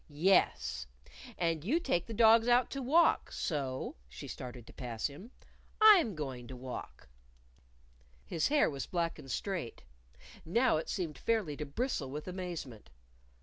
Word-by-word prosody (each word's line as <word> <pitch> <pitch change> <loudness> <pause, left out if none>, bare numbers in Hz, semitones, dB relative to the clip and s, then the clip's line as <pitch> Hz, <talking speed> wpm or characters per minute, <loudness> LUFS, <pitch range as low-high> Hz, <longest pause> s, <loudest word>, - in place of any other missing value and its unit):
"Yes. 65 - +2 0.5
And 165 -3 0
you 280 - +1
take 215 - -1
the 230 - -6
dogs 225 +1 +6
out 245 0 +4
to 275 - -4
walk. 315 +7 +3
So" 135 - -3
she - - -9
started 125 -2 -8
to - - -14
pass 120 -3 -5
him 155 +11 -5 0.5
"I'm 390 - +7
going 130 -5 -5
to 130 - -8
walk." 125 - -8 1.2
His 155 - 0
hair 295 +1 +4
was 140 -3 -4
black 170 -2 -2
and 135 - -11
straight. 170 - -4 0.6
Now 230 +4 +2
it 160 - -4
seemed 165 -7 -3
fairly 215 -10 0
to 150 - -5
bristle 160 - -2
with 150 +5 -6
amazement. 175 - -6
165 Hz, 145 wpm, -32 LUFS, -, 1.2 s, I'm